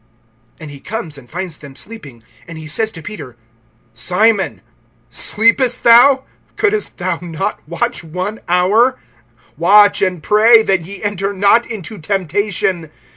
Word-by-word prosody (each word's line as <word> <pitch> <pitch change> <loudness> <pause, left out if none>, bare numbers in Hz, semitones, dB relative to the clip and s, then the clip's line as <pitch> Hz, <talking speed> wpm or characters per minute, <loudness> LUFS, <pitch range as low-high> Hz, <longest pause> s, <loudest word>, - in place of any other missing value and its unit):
(37)And 155 - -9
he 140 - -11
comes, 185 -4 -6
and 120 -3 -18
finds 180 -2 -6
them 140 -2 -13
sleeping. 145 - -11 0.2
And 170 -1 -9
he 155 - -9
says 220 +9 -1
to 165 - -10
Peter: 150 - -9 0.6
Simon, 195 - +1 0.5
sleepest 230 +3 +1
thou? 255 +3 +6 0.3
Couldest 420 0 -1
thou 180 -2 -2
not 165 -3 -4
watch 170 +1 -3
one 180 +7 -5
hour? 205 +9 +2 0.6
(38)Watch 205 +2 +5
and 180 -4 -6
pray, 220 +3 +5
that 190 -4 +1
ye 195 +6 -9
enter 200 -1 -2
not 200 +5 +2
into 215 -2 -7
temptation. 185 -1 -2
195 Hz, 135 wpm, -16 LUFS, 165-220 Hz, 0.6 s, thou